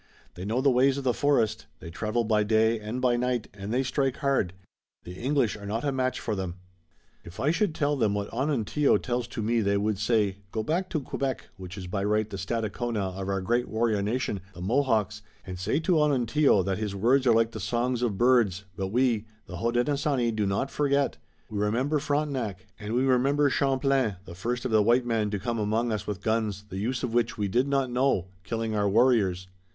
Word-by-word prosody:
They 90 Hz, -, -7 dB
know 115 Hz, +5 st, 0 dB
the 140 Hz, 0 st, +4 dB
ways 130 Hz, +2 st, +3 dB
of 140 Hz, -, -4 dB
the 125 Hz, -2 st, +2 dB
forest. 140 Hz, -7 st, +1 dB
They 85 Hz, -, -9 dB
travel 110 Hz, +6 st, -1 dB
by 110 Hz, -1 st, +2 dB
day 110 Hz, +1 st, +2 dB
and 110 Hz, +4 st, -4 dB
by 125 Hz, -1 st, +2 dB
night, 125 Hz, -2 st, -1 dB
and 100 Hz, +1 st, -7 dB
they 130 Hz, +3 st, +1 dB
strike 135 Hz, 0 st, 0 dB
hard. 135 Hz, -11 st, 0 dB, 0.5 s
The 90 Hz, -, -8 dB
English 125 Hz, +2 st, 0 dB
are 100 Hz, -1 st, -9 dB
not 115 Hz, +3 st, -2 dB
a 145 Hz, -, +1 dB
match 130 Hz, -1 st, -1 dB
for 110 Hz, -, -3 dB
them." 95 Hz, -3 st, -4 dB, 0.7 s
"If 85 Hz, +2 st, -12 dB
I 145 Hz, -, +2 dB
should 170 Hz, -1 st, 0 dB
tell 145 Hz, 0 st, +1 dB
them 110 Hz, -6 st, +1 dB
what 100 Hz, 0 st, -4 dB
Onontio 140 Hz, +2 st, +2 dB
tells 120 Hz, -2 st, -2 dB
to 115 Hz, -, -5 dB
me 115 Hz, +1 st, +1 dB
they 100 Hz, -1 st, +1 dB
would 105 Hz, 0 st, -1 dB
say: 105 Hz, -2 st, +1 dB
'Go 110 Hz, -, -2 dB
back 180 Hz, +8 st, -1 dB
to 155 Hz, -5 st, -1 dB
Quebec, 135 Hz, 0 st, -3 dB
which 95 Hz, 0 st, -9 dB
is 95 Hz, -, -6 dB
by 100 Hz, +2 st, -2 dB
right 105 Hz, +1 st, +1 dB
the 100 Hz, -, -7 dB
Stadacona 110 Hz, -1 st, -2 dB
of 95 Hz, 0 st, -4 dB
our 95 Hz, -1 st, 0 dB
great 120 Hz, +6 st, 0 dB
warrior 110 Hz, -2 st, +1 dB
nation, 105 Hz, -2 st, -2 dB
the 90 Hz, -, -9 dB
Mohawks, 110 Hz, -1 st, +1 dB, 0.2 s
and 90 Hz, -1 st, -7 dB
say 105 Hz, -, 0 dB
to 170 Hz, -1 st, +2 dB
Onontio 140 Hz, -5 st, +3 dB
that 95 Hz, +2 st, -2 dB
his 105 Hz, -2 st, -3 dB
words 125 Hz, +6 st, +3 dB
are 115 Hz, -, +6 dB
like 115 Hz, 0 st, +3 dB
the 110 Hz, -, -7 dB
songs 120 Hz, +4 st, -1 dB
of 115 Hz, -5 st, 0 dB
birds, 120 Hz, -6 st, +3 dB
but 95 Hz, 0 st, -2 dB
we, 115 Hz, 0 st, +1 dB, 0.2 s
the 90 Hz, -, -8 dB
Hodenosaunee, 120 Hz, -, +1 dB
do 105 Hz, -2 st, -1 dB
not 100 Hz, +8 st, -1 dB
forget. 140 Hz, -1 st, +1 dB, 0.3 s
We 105 Hz, -2 st, -4 dB
remember 125 Hz, +9 st, +1 dB
Frontenac, 140 Hz, -, -2 dB
and 110 Hz, +2 st, -4 dB
we 125 Hz, -, +2 dB
remember 135 Hz, +2 st, +3 dB
Champlain, 135 Hz, -5 st, +1 dB
the 85 Hz, -, -9 dB
first 120 Hz, +8 st, -3 dB
of 130 Hz, -, -1 dB
the 110 Hz, -1 st, +5 dB
white 120 Hz, +4 st, +3 dB
men 110 Hz, -3 st, 0 dB
to 105 Hz, -, -2 dB
come 115 Hz, +4 st, -2 dB
among 110 Hz, +3 st, 0 dB
us 105 Hz, -3 st, -3 dB
with 100 Hz, -2 st, -4 dB
guns, 110 Hz, -3 st, -1 dB
the 95 Hz, -, -5 dB
use 125 Hz, +5 st, -2 dB
of 120 Hz, -3 st, -2 dB
which 115 Hz, -1 st, +1 dB
we 105 Hz, -1 st, 0 dB
did 125 Hz, +8 st, +1 dB
not 135 Hz, -2 st, 0 dB
know, 125 Hz, -8 st, +1 dB
killing 115 Hz, +1 st, -3 dB
our 105 Hz, -1 st, +1 dB
warriors.'" 100 Hz, -5 st, +3 dB
115 Hz, 215 wpm, -27 LUFS, 105-130 Hz, 0.7 s, are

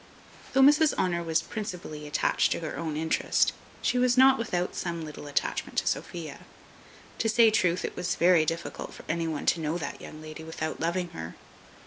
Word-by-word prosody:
Though 270 Hz, -, +5 dB
Mrs 295 Hz, +2 st, +5 dB
Honour 175 Hz, -2 st, 0 dB
was 165 Hz, -1 st, 0 dB
principally 180 Hz, -9 st, -6 dB
attached 145 Hz, -, +1 dB
to -, -, -5 dB
her 160 Hz, -, -4 dB
own 160 Hz, -3 st, -3 dB
interest, 160 Hz, +1 st, +1 dB, 0.3 s
she 250 Hz, -, +2 dB
was 250 Hz, 0 st, +3 dB
not 265 Hz, 0 st, +7 dB
without 180 Hz, -6 st, -1 dB
some 170 Hz, -2 st, -3 dB
little 150 Hz, -1 st, -9 dB
attachment 145 Hz, -, -2 dB
to -, -, +2 dB
Sophia. 160 Hz, -5 st, -3 dB, 0.8 s
To 225 Hz, -, +1 dB
say 225 Hz, 0 st, +6 dB
truth, 180 Hz, -4 st, +1 dB
it -, -, -5 dB
was 180 Hz, -, -1 dB
very 175 Hz, -1 st, +5 dB
difficult 165 Hz, +2 st, -4 dB
for -, -, -12 dB
any 165 Hz, 0 st, -1 dB
one 155 Hz, -3 st, -3 dB
to 170 Hz, -, +3 dB
know 155 Hz, +2 st, -1 dB
that 160 Hz, -, -6 dB
young 155 Hz, -, -9 dB
lady 155 Hz, +1 st, -9 dB
without 160 Hz, -1 st, -4 dB
loving 170 Hz, +2 st, -1 dB
her. 80 Hz, -, -7 dB
170 Hz, 185 wpm, -28 LUFS, 155-205 Hz, 0.8 s, not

